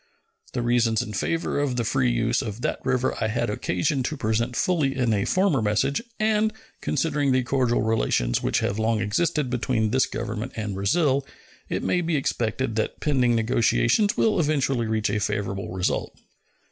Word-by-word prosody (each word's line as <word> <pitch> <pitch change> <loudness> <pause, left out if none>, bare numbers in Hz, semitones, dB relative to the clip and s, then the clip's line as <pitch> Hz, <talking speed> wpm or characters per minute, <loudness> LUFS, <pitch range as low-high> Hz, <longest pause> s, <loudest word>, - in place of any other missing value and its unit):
The 120 - -1
reasons 120 -2 +2
in 105 - -7
favor 165 - -1
of 140 -3 0
the 120 - 0
free 130 +2 +1
use 120 0 +1
of 110 +1 -6
that - - -2
river 130 -1 +1
I - - +2
had 110 - -1
occasion 110 - -1
to 150 +5 -3
present 115 +2 -1
fully 140 +2 +1
in 120 -4 +2
a 100 -1 0
former 185 - +2
message, 110 - +1 0.2
and, 215 0 +2 0.3
considering 145 -1 0
the 130 0 +2
cordial 125 -3 +1
relations - - +1
which - - 0
have 100 - -1
long 110 0 +1
existed 135 +6 0
between 115 -3 0
this 130 +1 +3
Government 110 +2 -4
and 105 -2 -3
Brazil, 135 - +1 0.5
it - - -2
may 180 - +1
be 170 -1 -1
expected 120 -3 -1
that 110 - -2
pending 125 -5 +2
negotiations 120 - +2
will 215 -4 +2
eventually 135 -6 +1
reach 110 -1 0
a 105 - 0
favorable 100 -2 -2
result. 90 0 -2
120 Hz, 170 wpm, -25 LUFS, 110-140 Hz, 0.5 s, this